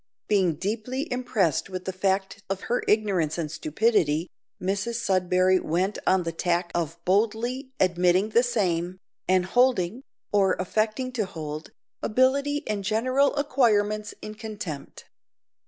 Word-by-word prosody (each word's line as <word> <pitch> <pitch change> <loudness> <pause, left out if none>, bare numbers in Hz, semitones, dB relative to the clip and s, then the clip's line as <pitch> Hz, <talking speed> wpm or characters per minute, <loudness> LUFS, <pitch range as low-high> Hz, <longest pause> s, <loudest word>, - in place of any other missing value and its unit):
Being 190 -6 +2
deeply 230 - -3
impressed 220 - 0
with 185 -1 -6
the 190 - -3
fact 190 +1 -1
of 195 0 -2
her 245 - -1
ignorance 195 -8 +1
and 155 -3 -3
stupidity, 160 -1 +1 0.3
Mrs 200 +5 -2
Sudberry 185 -3 +2
went 185 +6 -1
on 190 -1 +4
the 165 - -2
tack 175 +1 -1
of 165 -1 -2
boldly 230 +7 0
admitting 180 +2 +3
the 230 +2 +4
same, 185 -7 0 0.3
and 185 -1 +3
holding, 240 -1 +2 0.3
or 195 -2 +4
affecting 215 +7 -1
to 225 -6 -2
hold, 155 -2 -6 0.3
ability 280 +5 +2
and 210 -2 -2
general 255 +8 +2
acquirements 215 -7 +1
in 215 - -6
contempt. 210 -10 -7
200 Hz, 130 wpm, -26 LUFS, 180-230 Hz, 0.3 s, on